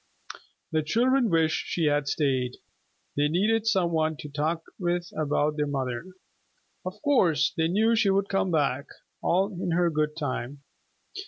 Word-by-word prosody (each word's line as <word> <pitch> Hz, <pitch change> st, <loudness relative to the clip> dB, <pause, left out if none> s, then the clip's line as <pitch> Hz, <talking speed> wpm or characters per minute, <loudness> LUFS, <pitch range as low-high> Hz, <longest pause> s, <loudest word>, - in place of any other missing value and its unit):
The 155 Hz, -, +2 dB
children 240 Hz, -, +2 dB
wished 165 Hz, -2 st, +1 dB
she 170 Hz, -, 0 dB
had 145 Hz, -1 st, +1 dB
stayed. 130 Hz, -4 st, 0 dB, 0.6 s
They 145 Hz, +1 st, +2 dB
needed 210 Hz, +7 st, +1 dB
some 190 Hz, -6 st, +2 dB
one 160 Hz, -1 st, 0 dB
to 150 Hz, -, -8 dB
talk 155 Hz, +3 st, -1 dB, 0.2 s
with 175 Hz, -1 st, -1 dB
about 150 Hz, 0 st, 0 dB
their 150 Hz, 0 st, 0 dB
mother. 130 Hz, +1 st, -3 dB, 0.8 s
Of 185 Hz, +3 st, -6 dB
course 165 Hz, -, +3 dB
they 160 Hz, 0 st, +1 dB
knew 220 Hz, +6 st, +3 dB
she 215 Hz, -3 st, +3 dB
would 195 Hz, 0 st, +2 dB
come 195 Hz, -1 st, 0 dB
back, 140 Hz, -4 st, 0 dB, 0.3 s
all 190 Hz, +3 st, +2 dB
in 175 Hz, -1 st, -2 dB
her 175 Hz, 0 st, +2 dB
good 150 Hz, 0 st, -1 dB
time. 140 Hz, -2 st, -4 dB
160 Hz, 155 wpm, -27 LUFS, 150-190 Hz, 0.8 s, course